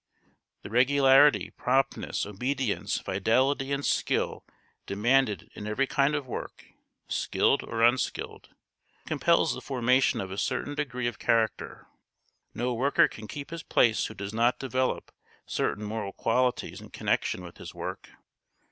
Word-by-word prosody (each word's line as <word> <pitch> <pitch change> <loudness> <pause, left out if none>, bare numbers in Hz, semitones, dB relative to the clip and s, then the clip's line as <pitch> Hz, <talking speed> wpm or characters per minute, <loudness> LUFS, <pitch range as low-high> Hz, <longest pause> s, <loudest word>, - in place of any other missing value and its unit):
The - - -9
regularity, 135 +3 +5
promptness, 135 +2 0
obedience, 125 +3 -2
fidelity, 130 +8 +1
and 140 0 -1
skill - - 0 0.4
demanded 105 -1 +1
in 105 - -7
every 105 +6 +1
kind 140 +2 +1
of 145 -2 -3
work, 125 - -7 0.4
skilled - - +1
or 115 0 -2
unskilled, 120 +2 0 0.6
compels - - +2
the - - -7
formation 130 0 +2
of 95 -1 -5
a 95 - -4
certain 130 +3 -2
degree 125 -4 -3
of 120 -2 -3
character. 115 -1 0 0.7
No 125 +1 -1
worker 135 +5 +3
can 110 0 -10
keep 140 +8 -7
his 165 0 -5
place 115 -6 +2
who 110 - -10
does 100 +1 -6
not 120 +2 +2
develop 130 -1 -2 0.3
certain 105 - -2
moral 105 -2 -4
qualities 125 +2 0
in - - -12
connection 90 - -1
with 85 -1 -11
his - - -10
work. - - -6
125 Hz, 140 wpm, -28 LUFS, 110-135 Hz, 0.7 s, regularity